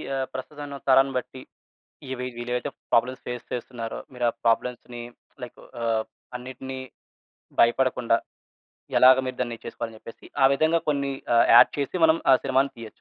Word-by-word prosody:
ఆహ్, 130 -1 -1
ప్రస్తుతం 145 +3 -7
ఉన్న 140 -1 -7
తరాన్ని 135 +1 +5
బట్టి 130 +1 -6 0.7
ఇవి 125 -1 -4
వీళ్ళేవైతే 125 +1 -3 0.2
ప్రాబ్లమ్స్ 125 +3 +2
ఫేస్ 125 -1 -5
చేస్తున్నారో 120 -2 -5
మీరు 125 -1 -2
ఆ - - -2
ప్రాబ్లమ్స్‌ని 120 +1 -1 0.4
లైక్ 125 - -9 0.2
ఆహ్, 115 -1 +1 0.3
అన్నిటిని 130 +1 -7 0.8
భయపడకుండా 120 -1 +3 0.8
ఎలాగ 130 0 +8
మీరు 130 0 -4
దాన్ని 120 -2 -3
చేసుకోవాలి 115 -1 -5
అని - - -12
చెప్పేసి 115 - -13 0.2
ఆ - - +9
విధంగా 160 +4 +2
కొన్ని 140 -1 0 0.2
ఆహ్, 115 - +6
యాడ్ - - +8
చేసి 140 +6 -2
మనం 160 +1 +3
ఆ - - +8
సినిమా‌ని 135 +1 +2
తీయొచ్చు. 115 -2 -8
125 Hz, 150 wpm, -25 LUFS, 120-135 Hz, 0.8 s, ఆ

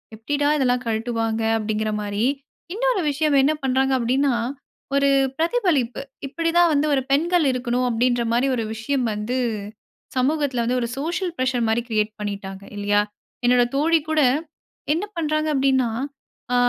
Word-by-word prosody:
எப்பிடிடா 290 +6 0
இதெல்லாம் 250 -2 +1
கழட்டுவாங்க 225 0 -1 0.2
அப்பிடிங்கிறமாரி. 215 -1 -1 0.5
இன்னொரு - - +1
விஷயம் 300 0 +1
என்ன 285 +3 +3
பண்றாங்க 265 0 +2
அப்பிடின்னா, 255 +2 +1 0.6
ஒரு 280 0 +4 0.3
பிரதிபலிப்பு. 325 - +1 0.3
இப்பிடிதான் 335 +4 +2
வந்து 290 +1 +2
ஒரு 270 - +2
பெண்கள் 335 +3 +3
இருக்கணும், 250 0 -1
அப்பிடின்றமாரி 240 +1 +1
ஒரு 230 - -1
விஷயம் 255 +3 -1
வந்து 210 +5 -2 0.8
சமூகத்தில 270 -2 +1
வந்து 245 +2 0
ஒரு 235 - -1
சோசியல் 345 +4 -2
பிரஷர்மாரி 240 -3 +1
கிரியேட் 215 -1 0
பண்ணிட்டாங்க 200 -2 -5
இல்லயா. 205 0 +2 0.4
என்னுடைய 245 0 +4
தோழிகூட 315 0 +2 0.7
என்ன 340 +6 -1
பண்றாங்க 310 -1 0
அப்பிடின்னா, 265 -3 +2 0.6
ஆ - - +3
255 Hz, 120 wpm, -22 LUFS, 230-300 Hz, 0.8 s, ஒரு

